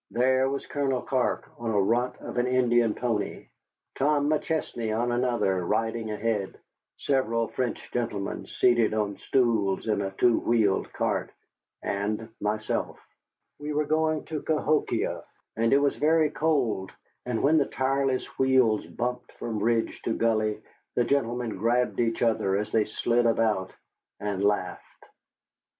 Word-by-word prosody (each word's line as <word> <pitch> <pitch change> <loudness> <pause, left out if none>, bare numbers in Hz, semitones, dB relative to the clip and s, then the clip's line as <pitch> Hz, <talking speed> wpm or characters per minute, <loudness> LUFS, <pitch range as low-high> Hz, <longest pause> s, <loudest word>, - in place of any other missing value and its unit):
There 130 +2 +2
was 140 0 -3
Colonel 135 -3 -1
Clark 130 -2 0
on 120 -1 -3
a 105 -2 +2
runt 120 +6 +1
of - - -4
an 120 - +1
Indian 120 -3 +3
pony; 115 -4 -3 0.4
Tom 145 +1 +2
McChesney 120 -8 -1
on 120 +1 0
another, 120 -7 +1
riding 110 +3 -1
ahead, 105 -2 -2 0.4
several 115 -4 0
French 125 -2 -3
gentlemen 105 -5 -3
seated 120 -3 +2
on 105 -2 -1
stools 115 -7 +1
in 105 -2 +1
a 95 - -2
two 115 +5 +3
wheeled 110 -5 +1
cart, - - -1 0.5
and 105 +3 -2
myself. 105 +1 -2 0.6
We 150 +1 -4
were 150 +1 +1
going 155 +1 +1
to 155 -2 -4
Cahokia, 155 -1 0 0.3
and 115 +1 +1
it - - +6
was 140 0 +2
very 155 0 +3
cold, 130 -13 0 0.4
and 120 -2 -1
when 155 +3 +5
the 140 - +1
tireless 135 0 0
wheels 130 -8 +3
bumped 125 +7 -4
from 110 -3 -4
ridge 115 +1 0
to 115 - 0
gully, 110 -2 0 0.3
the 120 - +3
gentlemen 120 -4 -1
grabbed 120 +4 +1
each 115 -1 +1
other 100 -4 +2
as 105 +1 -3
they 110 -2 +3
slid 120 +2 +1
about, 110 -5 +1 0.5
and 100 -2 -2
laughed. 105 0 -2
120 Hz, 140 wpm, -27 LUFS, 110-130 Hz, 0.6 s, it